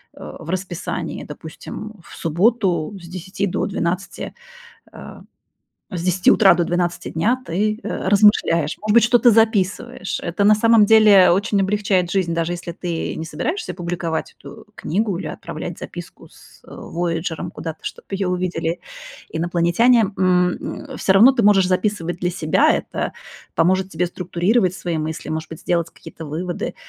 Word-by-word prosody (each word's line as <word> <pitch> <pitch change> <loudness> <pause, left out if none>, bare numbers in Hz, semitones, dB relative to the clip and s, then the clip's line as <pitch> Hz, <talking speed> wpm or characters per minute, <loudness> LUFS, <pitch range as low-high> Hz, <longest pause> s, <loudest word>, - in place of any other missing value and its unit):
э, - - -9
в 160 - -10
расписании, 185 -1 -4
допустим, 215 0 -9
в - - -13
субботу 180 0 +1
с 170 - -12
10 185 +3 -4
до - - -1
12, 180 0 -3 0.6
э, - - -11 0.7
с 175 -2 -3
10 180 +1 +3
утра 190 -4 +6
до 175 - +1
12 175 0 -2
дня 230 +11 0
ты, 210 +5 -1
э, - - -3
размышляешь, 190 -6 +3
может 215 - 0
быть, 235 - +6
что-то 240 0 +5
записываешь. 220 0 +1
Это 175 +3 -2
на 215 - +7
самом 225 -1 +5
деле 210 -4 +7
очень 195 +3 +1
облегчает 195 -3 +1
жизнь, 180 -4 0
даже 165 +1 -1
если 175 0 -7
ты 170 -1 -4
не 160 - -4
собираешься 355 - -3
публиковать 170 -2 -4
эту - - -12
книгу 200 +3 -1
или - - -5
отправлять - - -7
записку - - -10
с, - - -19
э, - - -20
"Вояджером" 170 0 -4
куда-то, 160 -1 -6
чтобы - - -7
её 195 0 -2
увидели 180 -2 -2 0.5
инопланетяне. 175 +8 +3 0.2
М, 180 -1 +2
м, - - -7
всё 190 - +2
равно 220 +7 +7
ты 240 - 0
можешь 195 -3 +5
записывать 185 -2 -1
для 175 - -1
себя, 155 -3 +2
это - - -3 0.4
поможет 185 +3 +2
тебе 180 +1 -1
структурировать 180 +3 0
свои 170 -4 -3
мысли, 155 +1 -5
может 160 0 -4
быть, 160 - -9
сделать 170 -2 -1
какие-то 160 - -11
выводы. 175 +4 -4
180 Hz, 155 wpm, -20 LUFS, 170-205 Hz, 0.7 s, на